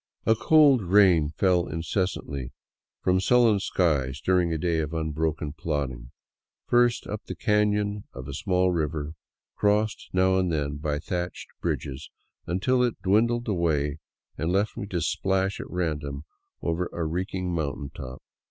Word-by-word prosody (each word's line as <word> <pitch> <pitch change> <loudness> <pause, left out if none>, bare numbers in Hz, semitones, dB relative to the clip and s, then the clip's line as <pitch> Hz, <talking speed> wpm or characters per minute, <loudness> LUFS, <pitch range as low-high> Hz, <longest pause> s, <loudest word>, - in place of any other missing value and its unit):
A 110 - +5
cold 140 +1 +5
rain 90 -5 +5
fell 90 +2 +2
incessantly 80 -4 -3 0.5
from 90 0 +3
sullen 115 +1 +4
skies 75 -9 0
during 90 -2 +2
a 80 - 0
day 85 0 0
of 80 +1 -3
unbroken 80 -1 -2
plodding, 70 -6 -3 0.6
first 120 0 +3
up 105 +1 -6
the - - -6
canon 105 -1 +1
of 65 0 -8
a 70 - -6
small 90 +4 +1
river, 75 -2 -2 0.4
crossed 105 +1 0
now 95 0 +3
and 90 -2 0
then 75 -2 -1
by 75 0 -2
thatched 90 +3 -4
bridges, 70 +2 -3 0.4
until 110 +9 +1
it 120 -2 0
dwindled 120 +5 +2
away 80 -6 0 0.4
and 80 +3 0
left 100 +3 +1
me 100 - -5
to 90 -4 -2
splash 95 +3 0
at - - -7
random 75 -5 -3 0.4
over 85 +2 0
a 85 - -2
reeking 90 +2 -2
mountain 70 -3 -3
top. 65 -1 -8
90 Hz, 145 wpm, -26 LUFS, 75-100 Hz, 0.6 s, A